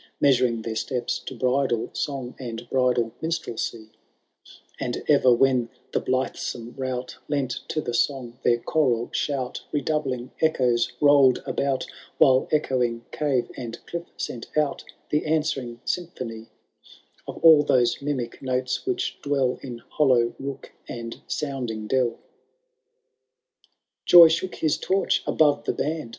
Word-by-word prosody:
Measuring 125 -5 +3
their 110 -1 -4
steps 125 +2 -2
to 130 - -8
bridal 125 -2 0
song 135 -4 -3
And 120 -2 -6
bndal 125 -3 +2
minstrelsy; 120 -9 -3 0.9
And 120 - -3
ever 140 -4 +5
when 125 -1 +3 0.2
the - - +2
blithesome 125 -2 -3
rout 130 -1 -4
Lent 140 -4 -1
to 155 - -2
the 120 - -4
song 125 -1 -1
their 120 -1 +3
choral 120 -3 0
shout, 135 -4 -2
Redoubling 135 -4 -2
echoes 125 -7 +2
rolPd 140 -3 +5
about, 135 -1 -1 0.3
While 130 -1 +5
echoing 125 -6 0
cave 140 -5 0
and 120 -3 -6
cliff 170 0 -5
sent 120 - -5
out 150 -2 +1 0.3
The 150 - +2
answering 150 -7 -1
symphony 120 -11 -4 0.8
Of - - -6
all 160 -2 +9
those 125 -4 +2
mimic 135 -5 -3
notes 130 - -2
which 375 0 -2
dwell 135 -3 0
In 120 -3 -8
hollow 125 -5 +3
took 135 0 -6 0.2
and 115 -1 -7
sounding 125 -7 -3
delL 130 +1 +2
XIII. - - -21 1.9
Joy 175 -2 +10
shook 175 +3 -1
his 155 -1 +1
torch 195 +1 +1
above 145 -2 +3
the - - 0
band. 155 -4 -3
130 Hz, 130 wpm, -25 LUFS, 120-145 Hz, 1.9 s, Joy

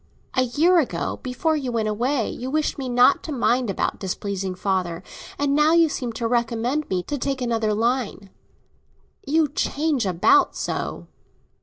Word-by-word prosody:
A 255 - +2
year 315 +9 +3
ago, 290 - -2
before 265 +5 -1
I 275 -4 -2
went 230 -3 -1
away, 235 +3 0
you 255 +2 -5
wished 305 0 -1
me 260 -2 -3
not 245 +2 +4
to - - -7
mind 245 -3 +1
about 195 - -1
displeasing 190 0 -3
father; 180 -2 -2 0.3
and 285 -1 +1
now 300 +2 +4
you 335 -1 +5
seem 250 -4 -3
to 230 +1 -2
recommend 240 +5 -1
me 180 -2 -1
to 290 +6 -4
take 270 +1 -2
another 225 -4 0
line. 225 -3 -1 1.0
You 310 +2 +3
change 285 -4 -1
about 350 - +3
so." - - -4
245 Hz, 160 wpm, -23 LUFS, 215-290 Hz, 1.0 s, you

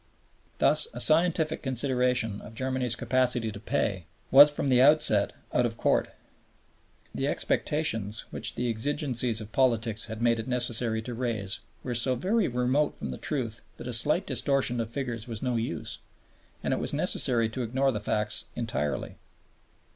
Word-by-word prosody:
Thus - - +3
a - - -5
scientific 160 -1 +5
consideration 125 -4 0
of 110 - -12
Germany's 130 -1 -1
capacity 120 -2 0
to 100 - -9
pay 95 -4 -2 0.2
was 145 +3 +9
from 145 -1 -3
the 125 -1 +4
outset 135 -8 +4 0.2
out - - +3
of - - -2
court. - - +1 1.0
The - - -2
expectations 110 -9 0
which - - +1
the 125 - -2
exigencies 120 -1 -1
of 110 0 -10
politics 115 -5 0
had 110 -1 -7
made 115 -1 +2
it 110 - -5
necessary 120 -2 0
to 120 - -6
raise 115 -5 -3 0.2
were 125 - -3
so 125 +2 0
very 195 - 0
remote 125 +4 0
from - - -6
the - - -7
truth 120 -7 -3 0.2
that - - -8
a 125 - -4
slight 150 - +1
distortion 135 -4 +1
of 115 -1 -3
figures 120 -3 -5
was 115 -1 -6
no 125 -2 -1
use, 115 -8 -4 0.6
and - - 0
it - - -1
was - - 0
necessary 115 -3 +1
to 120 +3 -5
ignore 130 +4 0
the 105 - -3
facts 105 0 -1
entirely. 115 -12 -3
120 Hz, 160 wpm, -27 LUFS, 110-130 Hz, 1.0 s, was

